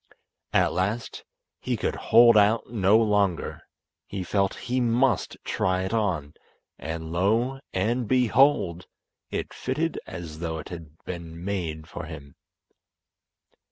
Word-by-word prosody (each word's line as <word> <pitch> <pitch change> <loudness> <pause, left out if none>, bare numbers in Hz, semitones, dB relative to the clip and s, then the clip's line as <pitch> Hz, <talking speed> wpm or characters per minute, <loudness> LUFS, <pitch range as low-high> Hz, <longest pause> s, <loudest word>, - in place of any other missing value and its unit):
At - - +3
last 100 +6 -2 0.3
he - - -2
could - - -1
hold 120 -1 +6
out 105 +2 +5
no 105 -2 +4
longer. 105 -5 +1 0.5
He 100 -2 -4
felt 95 +1 0
he 125 +2 0
must 120 -1 +1
try 95 0 0
it 95 - -3
on, 95 -10 -1 0.5
and 80 0 -5
lo! 115 +10 +1
and 115 +5 0
behold, 125 - +3 0.4
it - - -4
fitted - - -2
as 80 -2 -7
though 80 -1 -3
it 80 - -8
had 80 -3 -9
been 85 -1 -7
made 85 -6 -3
for - - -7
him. 70 -1 -10
95 Hz, 125 wpm, -26 LUFS, 85-115 Hz, 0.5 s, hold